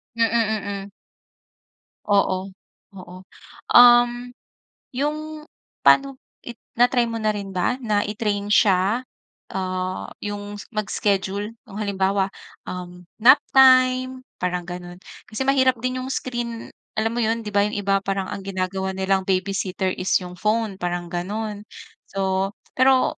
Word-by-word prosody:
Mm, 230 0 +3
mm. 205 -3 -1 1.2
Oo, 195 -2 +1 0.5
oo. 180 0 -11 0.6
Uhm, 245 0 +6 0.6
'yong 295 +4 -1 0.6
pano 275 0 +5 0.3
it 240 - -6 0.2
na-try 245 0 +4
mo 230 - -3
na 215 -1 0
rin 200 -1 -5
ba 190 +6 0
na 210 -3 +1
i-train 205 -1 -2
siya, 205 +2 +3 0.5
ah, 185 0 -3 0.2
'yong 205 0 -5
s 205 - -10
mag-schedule 205 -1 -1 0.2
nung, 205 +1 -9
halimbawa, 195 -1 0 0.3
um, 180 -1 -8 0.2
nap 240 +6 +7
time 255 -1 +5 0.2
parang 180 0 -1
gano'n? 175 +1 -9 0.2
Kasi 220 +5 -4
mahirap 260 -3 +2
din 255 0 -1
'yong 255 - -4
screen 240 -2 -4 0.2
alam 220 +1 0
mo 240 - -4
'yon? 225 +1 0
'Di 210 - -6
ba, 205 0 +3
'yong 210 - -4
iba 195 0 +2
parang 195 -1 -3
ang 195 - -6
ginagawa 190 0 -2
nilang 190 0 0
babysitter 190 0 -1
is 185 - 0
'yong 180 0 -9
phone 215 -2 0
parang 175 -1 -3
gano'n. 205 +4 -4 0.4
So 195 0 -1 0.2
pero 260 0 +4
205 Hz, 130 wpm, -23 LUFS, 190-235 Hz, 1.2 s, nap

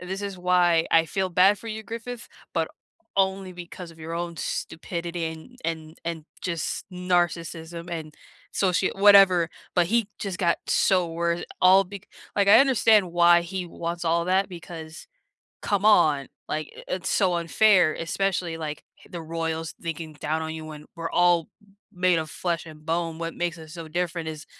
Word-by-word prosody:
"This 190 +2 -5
is 200 -2 -5
why 175 -2 +3
I 165 0 +5
feel 190 +3 -1
bad 190 +4 +5
for 230 - -12
you, 220 0 -5
Griffith, 230 +1 -7 0.3
but - - +1 0.5
only 190 -1 +1
because 175 0 -9
of 165 - -17
your 160 +1 -6
own 170 0 -4
stupidity 170 0 -4
and 160 +11 -9
and 160 -1 -4
and 165 -2 -4 0.2
just 170 -4 -3
narcissism 175 -2 -1
and 160 -3 -6 0.4
socia 190 0 +1
whatever." 195 -4 +7 0.3
But 175 - +4
he 230 -2 +2
just 195 -3 -4
got 170 -3 +2
so 185 -3 +3
wor 170 +1 -1 0.2
all 190 +2 +7
bec 200 +1 -10 0.3
like, 200 -1 +3
I 220 - +9
understand 220 -8 +4
why 175 0 +6
he 185 +1 -4
wants 170 +1 -5
all 170 +1 +2
that 190 +2 +2
because, 165 -2 -9 0.6
come 205 -1 0
on, 150 -10 +4 0.2
like, 155 0 -3
i - - -9
it's 185 - -4
so 185 -3 +2
unfair, 175 0 +4
especially, 180 0 -1
like, 150 -2 -5 0.2
h - - -18
the 170 -2 -6
royals 165 0 -3
thinking 165 -1 -5
down 155 +2 -2
on 160 0 -4
you 160 - -7
when 150 -1 -10
we're 165 0 -4
all 175 -2 +3 0.4
made 180 -2 +2
of 155 - -6
flesh 170 -2 -2
and 155 -1 -13
bone, 165 0 -1
what 165 0 -4
makes 175 -1 -2
us 155 -1 -11
so 165 -2 -8
different 170 -1 -2
is 155 -1 -7
170 Hz, 175 wpm, -25 LUFS, 165-185 Hz, 0.6 s, I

